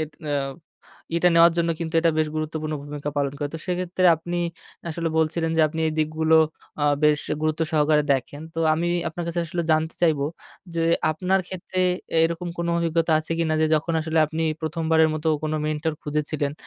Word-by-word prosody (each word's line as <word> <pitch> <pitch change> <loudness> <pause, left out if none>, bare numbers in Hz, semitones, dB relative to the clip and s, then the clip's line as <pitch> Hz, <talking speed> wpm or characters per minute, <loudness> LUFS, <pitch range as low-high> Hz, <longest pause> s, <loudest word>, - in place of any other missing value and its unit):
এট 155 0 -3 0.2
আ - - 0 0.8
এটা 180 +1 +4
নেওয়ার 170 0 +7
জন্য 170 0 +2
কিন্তু 165 -1 -4
এটা 165 0 +3
বেশ 155 -1 +2
গুরুত্বপূর্ণ 155 0 -3
ভূমিকা 145 0 -5
পালন 140 -1 0
করে। 145 - -2
তো - - -3
সেক্ষেত্রে 180 0 0
আপনি 175 +2 -5 0.5
আসলে 165 +1 -2
বলছিলেন 160 +1 +1
যে, - - +4
আপনি 160 +2 -5
এই - - -2
দিকগুলো 155 +1 +2 0.4
আ - - -1 0.2
বেশ 150 -1 +4 0.2
গুরুত্ব 155 0 -1
সহকারে 150 -1 +3
দেখেন। 140 +3 -3
তো - - -5 0.2
আমি 170 +2 -1 0.2
আপনার 170 +1 -5
কাছে 170 +1 -1
আসলে 170 0 -2
জানতে 160 +1 0
চাইবো 155 -4 +3 0.5
যে 165 - 0 0.3
আপনার 185 +4 +1
ক্ষেত্রে 185 0 -6 0.4
এ - - +3
এরকম 170 +1 -2
কোন 170 - -1
অভিজ্ঞতা 165 -1 +1
আছে 155 +1 -4
কিনা 160 -1 +1
যে 155 - +4
যখন 160 +2 0
আসলে 160 0 -1
আপনি 160 +1 -3 0.2
প্রথমবারের 160 0 +2
মতো 155 +1 -1
কোন 155 0 -2
মেন্টর 155 +1 -1
খুঁজেছিলেন 150 -1 -2
160 Hz, 185 wpm, -24 LUFS, 155-170 Hz, 0.8 s, নেওয়ার